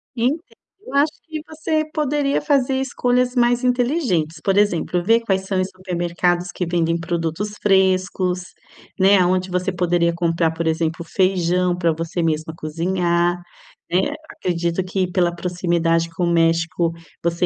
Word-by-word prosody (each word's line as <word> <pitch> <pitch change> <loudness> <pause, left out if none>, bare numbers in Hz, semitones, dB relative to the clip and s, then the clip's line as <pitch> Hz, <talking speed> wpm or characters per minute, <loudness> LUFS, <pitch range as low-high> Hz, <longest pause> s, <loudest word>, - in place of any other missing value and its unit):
Entendo, 260 +7 0 0.5
eu - - -8
acho 290 +2 +4
que 315 -1 -6
você 315 0 -1
poderia 290 -2 0
fazer 270 -3 +2
escolhas 250 -1 0
mais 245 0 +2
inteligentes. 245 - 0
Por 195 0 +1
exemplo, 180 -3 +1
ver 225 +5 +4
quais 195 -4 0
são 190 -1 -1
os 185 - -1
supermercados 175 -1 -1
que 180 - -3
vendem 170 -1 0
produtos 170 +4 -3
frescos, 185 -2 +2 0.6
né, 195 +2 +6
aonde 185 +1 +1
você 180 +1 0
poderia 175 -1 +1
comprar, 165 -1 +1
por 165 +1 -4
exemplo, 160 +1 -1
feijão 180 -1 +1
para 170 -2 +2
você 165 +2 -3
mesma 160 0 -1
cozinhar, 170 +2 0 0.5
né? 185 +2 +1 0.2
Acredito 170 - -2
que 185 0 -2
pela 175 -1 +1
proximidade 170 -2 0
com 165 +2 -3
o - - 0
México, 165 +1 +2 0.3
você 170 +1 +1
180 Hz, 145 wpm, -21 LUFS, 170-205 Hz, 0.6 s, né